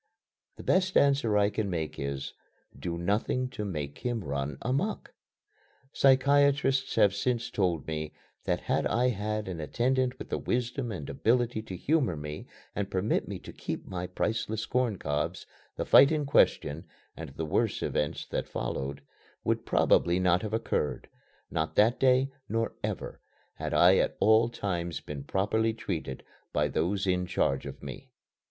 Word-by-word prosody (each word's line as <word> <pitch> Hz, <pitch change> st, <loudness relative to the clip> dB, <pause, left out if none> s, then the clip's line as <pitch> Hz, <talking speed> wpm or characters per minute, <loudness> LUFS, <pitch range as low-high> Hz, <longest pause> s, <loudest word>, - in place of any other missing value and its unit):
The -, -, -10 dB
best 185 Hz, 0 st, +2 dB
answer 135 Hz, -7 st, +3 dB
I 100 Hz, 0 st, +3 dB
can 105 Hz, -2 st, -2 dB
make 80 Hz, -4 st, -3 dB
is: 70 Hz, -1 st, -4 dB, 0.4 s
"Do 85 Hz, -1 st, -4 dB
nothing 105 Hz, +8 st, 0 dB
to 115 Hz, -4 st, -5 dB
make 75 Hz, -8 st, -4 dB
him 120 Hz, -4 st, -2 dB
run 70 Hz, -1 st, -3 dB
amuck." 140 Hz, -, -1 dB, 0.8 s
Psychiatrists 140 Hz, 0 st, +3 dB
have 105 Hz, -4 st, +5 dB
since 120 Hz, +3 st, -1 dB
told 90 Hz, -5 st, 0 dB
me 75 Hz, -1 st, -4 dB, 0.3 s
that -, -, 0 dB
had -, -, 0 dB
I 125 Hz, +2 st, +2 dB
had 105 Hz, -1 st, -2 dB
an 90 Hz, -3 st, -4 dB
attendant 125 Hz, +10 st, 0 dB
with -, -, -8 dB
the -, -, -1 dB
wisdom 120 Hz, 0 st, -2 dB
and 80 Hz, -9 st, -5 dB
ability 120 Hz, -1 st, +1 dB
to 100 Hz, -4 st, -7 dB
humor 140 Hz, -, +1 dB
me 75 Hz, 0 st, -7 dB, 0.3 s
and 100 Hz, -1 st, -2 dB
permit 95 Hz, +3 st, 0 dB
me -, -, -4 dB
to -, -, -10 dB
keep -, -, -5 dB
my 90 Hz, -1 st, -4 dB
priceless 110 Hz, +1 st, -2 dB
corn 125 Hz, -5 st, 0 dB
cobs, 75 Hz, -3 st, -2 dB, 0.3 s
the -, -, -2 dB
fight 140 Hz, -, +7 dB
in 155 Hz, -2 st, 0 dB
question, 80 Hz, -, +2 dB, 0.3 s
and 80 Hz, -2 st, -7 dB
the 80 Hz, -, -3 dB
worse 75 Hz, -, 0 dB
events 75 Hz, -, -1 dB
that -, -, -3 dB
followed, 70 Hz, +1 st, -4 dB, 0.4 s
would -, -, -1 dB
probably 85 Hz, +1 st, +3 dB
not 90 Hz, -1 st, +3 dB
have 105 Hz, -, -4 dB
occurred 110 Hz, -9 st, -2 dB, 0.4 s
not 80 Hz, 0 st, -2 dB
that 110 Hz, +4 st, +4 dB
day, 130 Hz, +1 st, +4 dB, 0.2 s
nor 115 Hz, +2 st, -1 dB
ever, -, -, -4 dB, 0.3 s
had -, -, -5 dB
I -, -, +6 dB
at -, -, +1 dB
all 110 Hz, +2 st, +5 dB
times 85 Hz, -7 st, -3 dB
been 70 Hz, -2 st, -7 dB
properly 110 Hz, +5 st, +1 dB
treated 85 Hz, -, -4 dB, 0.3 s
by 75 Hz, 0 st, +1 dB
those 95 Hz, +8 st, 0 dB
in 90 Hz, -1 st, +1 dB
charge 70 Hz, -5 st, 0 dB
of -, -, -9 dB
me. -, -, -8 dB
105 Hz, 160 wpm, -29 LUFS, 85-125 Hz, 0.8 s, fight